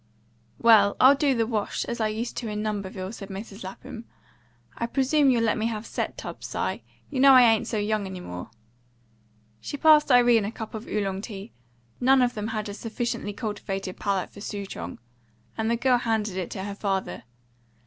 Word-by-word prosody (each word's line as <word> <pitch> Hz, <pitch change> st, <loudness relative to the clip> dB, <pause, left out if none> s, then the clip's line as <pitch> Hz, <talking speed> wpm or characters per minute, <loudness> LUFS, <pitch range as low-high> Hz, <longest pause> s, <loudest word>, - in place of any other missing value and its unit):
"Well, 210 Hz, -3 st, +5 dB
I'll 260 Hz, +2 st, +8 dB
do 280 Hz, -1 st, +2 dB
the 230 Hz, -1 st, +1 dB
wash, 220 Hz, -3 st, -2 dB
as 235 Hz, -1 st, -4 dB
I 220 Hz, -, +2 dB
used 220 Hz, +3 st, -4 dB
to 235 Hz, -, -3 dB
in 210 Hz, 0 st, -3 dB
Lumberville," 200 Hz, -2 st, -4 dB
said 200 Hz, -3 st, -9 dB
Mrs. 200 Hz, +2 st, -8 dB
Lapham. 230 Hz, +5 st, -9 dB, 0.7 s
"I 235 Hz, -, -2 dB
presume 275 Hz, +3 st, +3 dB
you'll 240 Hz, -3 st, +3 dB
let 220 Hz, -2 st, +1 dB
me 220 Hz, -, +1 dB
have 220 Hz, -1 st, -4 dB
set -, -, -4 dB
tubs, -, -, -7 dB
Si. -, -, -2 dB, 0.3 s
You 270 Hz, -, -2 dB
know 275 Hz, 0 st, +8 dB
I 255 Hz, -1 st, +9 dB
ain't 225 Hz, -1 st, +4 dB
so 225 Hz, -, -2 dB
young 210 Hz, -1 st, -1 dB
any 190 Hz, -1 st, -7 dB
more." 90 Hz, -, -7 dB, 1.1 s
She 285 Hz, -, -6 dB
passed 300 Hz, -1 st, +5 dB
Irene 240 Hz, -3 st, +5 dB
a 205 Hz, -, -3 dB
cup 220 Hz, -2 st, -8 dB
of 220 Hz, +1 st, -7 dB
Oolong 195 Hz, -2 st, -2 dB
tea, 205 Hz, 0 st, -8 dB, 0.5 s
none 260 Hz, +1 st, +5 dB
of 245 Hz, -, +1 dB
them 210 Hz, 0 st, -4 dB
had 215 Hz, -1 st, -3 dB
a 205 Hz, -, -5 dB
sufficiently 225 Hz, -1 st, -3 dB
cultivated 200 Hz, -3 st, -5 dB
palate 195 Hz, -2 st, -1 dB
for 205 Hz, -, -12 dB
Sou 205 Hz, -1 st, -5 dB
chong, 90 Hz, -, -7 dB, 0.6 s
and 220 Hz, 0 st, -1 dB
the 235 Hz, -, +2 dB
girl 250 Hz, 0 st, +3 dB
handed 220 Hz, -4 st, -1 dB
it 185 Hz, -2 st, -3 dB
to 190 Hz, -, -5 dB
her 200 Hz, 0 st, -4 dB
father. 195 Hz, -1 st, -2 dB
220 Hz, 195 wpm, -26 LUFS, 200-240 Hz, 1.1 s, I